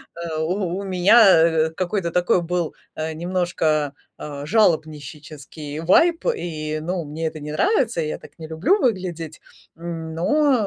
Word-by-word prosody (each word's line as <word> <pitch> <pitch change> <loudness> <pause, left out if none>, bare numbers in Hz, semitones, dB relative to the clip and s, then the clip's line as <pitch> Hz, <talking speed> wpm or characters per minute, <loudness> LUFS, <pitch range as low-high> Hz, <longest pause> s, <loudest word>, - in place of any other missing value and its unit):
Э, 170 -2 -5
у 180 +2 -1
у 200 - -5
меня, 195 +5 +5 0.4
э, - - -5
какой-то 175 0 -2
такой 180 0 +2
был, 175 -1 -2 0.2
э, 160 0 -3
немножко, 160 -4 -1 0.2
э, 145 -1 -7
жалобнищический 155 - -2
вайб. 330 - +4
И, 155 -2 -4
ну, 175 +2 -3
мне 155 +2 -4
это 155 - -6
не 150 +1 -6
нравится. 245 - +1
Я 155 -1 -3
так - - -16
не 160 - -7
люблю 180 - +1
выглядеть. 175 - -2 0.3
Но, 170 - 0
170 Hz, 140 wpm, -22 LUFS, 155-185 Hz, 0.4 s, меня